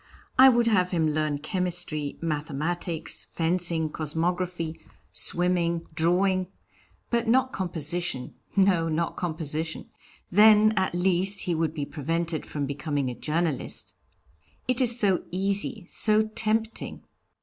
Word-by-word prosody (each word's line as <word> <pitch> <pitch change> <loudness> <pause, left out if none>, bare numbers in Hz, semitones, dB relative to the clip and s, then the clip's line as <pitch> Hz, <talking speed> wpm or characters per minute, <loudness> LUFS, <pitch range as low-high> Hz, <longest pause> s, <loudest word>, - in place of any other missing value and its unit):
I 265 +1 +10
would 240 -2 +3
have 190 -5 +3
him 165 -4 +1
learn 155 -1 0
chemistry, 165 -2 -2
mathematics, 160 +2 -2
fencing, 165 -2 0
cosmography, 165 +1 -2 0.3
swimming, 170 -1 0
drawing, 185 +3 +2 0.6
but 235 -1 +1
not 260 +3 +3
composition 170 -6 -2 0.2
no, 190 -4 +3
not 165 +1 -1
composition. 160 -2 -2 0.4
Then, 215 +2 +6
at 190 -3 0
least, 190 +2 +3
he 175 - -1
would 160 -1 -1
be 145 -3 -2
prevented 160 +3 -3
from 145 -2 -3
becoming 140 -1 -2
a - - -7
journalist. 160 +1 -2 0.7
It 255 0 +2
is 240 -1 +3
so 195 -4 +3
easy, 195 +2 -1
so 215 +1 +2
tempting. 220 +1 -1
175 Hz, 115 wpm, -26 LUFS, 155-195 Hz, 0.7 s, I